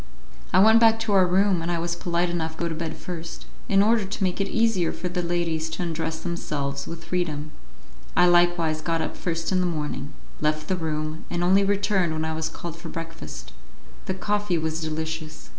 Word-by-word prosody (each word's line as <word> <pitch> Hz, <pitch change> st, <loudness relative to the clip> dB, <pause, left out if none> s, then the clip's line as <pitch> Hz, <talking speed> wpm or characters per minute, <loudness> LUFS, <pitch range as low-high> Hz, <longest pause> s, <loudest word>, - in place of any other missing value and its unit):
I -, -, +4 dB
went 220 Hz, +4 st, +7 dB
back 225 Hz, -1 st, +5 dB
to 220 Hz, -2 st, 0 dB
our 190 Hz, -2 st, +6 dB
room, 190 Hz, 0 st, +3 dB
and 165 Hz, -, -2 dB
I 170 Hz, -, +1 dB
was 170 Hz, +1 st, -1 dB
polite 175 Hz, 0 st, 0 dB
enough 160 Hz, -2 st, -2 dB
to -, -, -3 dB
go -, -, +1 dB
to -, -, -2 dB
bed 160 Hz, 0 st, -4 dB
first, 170 Hz, -2 st, -7 dB, 0.2 s
in 195 Hz, 0 st, +5 dB
order 225 Hz, 0 st, +3 dB
to 195 Hz, +1 st, -3 dB
make 185 Hz, +1 st, 0 dB
it 195 Hz, -, 0 dB
easier 225 Hz, -6 st, +2 dB
for 180 Hz, -, -4 dB
the 180 Hz, 0 st, -1 dB
ladies 170 Hz, -2 st, -1 dB
to 180 Hz, -, -3 dB
undress 160 Hz, -1 st, -3 dB
themselves 140 Hz, -5 st, -3 dB
with 165 Hz, 0 st, -7 dB
freedom; 155 Hz, -4 st, -2 dB, 0.7 s
I -, -, +7 dB
likewise 175 Hz, -3 st, +3 dB
got 165 Hz, 0 st, 0 dB
up -, -, -4 dB
first 165 Hz, -1 st, -2 dB
in 185 Hz, -, +3 dB
the 180 Hz, -, +2 dB
morning, 150 Hz, -3 st, -3 dB, 0.3 s
left 155 Hz, 0 st, 0 dB
the 190 Hz, -, +2 dB
room, 155 Hz, -2 st, -3 dB
and 175 Hz, 0 st, -1 dB
only 190 Hz, +3 st, +5 dB
returned 195 Hz, -4 st, +1 dB
when 160 Hz, 0 st, -1 dB
I 160 Hz, -, -1 dB
was 160 Hz, 0 st, -2 dB
called 170 Hz, -1 st, -7 dB
for 170 Hz, -, -8 dB
breakfast. 165 Hz, -, -7 dB, 0.5 s
The 190 Hz, -, -1 dB
coffee 205 Hz, -1 st, 0 dB
was 160 Hz, 0 st, -2 dB
delicious. 160 Hz, 0 st, -4 dB
170 Hz, 210 wpm, -25 LUFS, 160-185 Hz, 0.7 s, went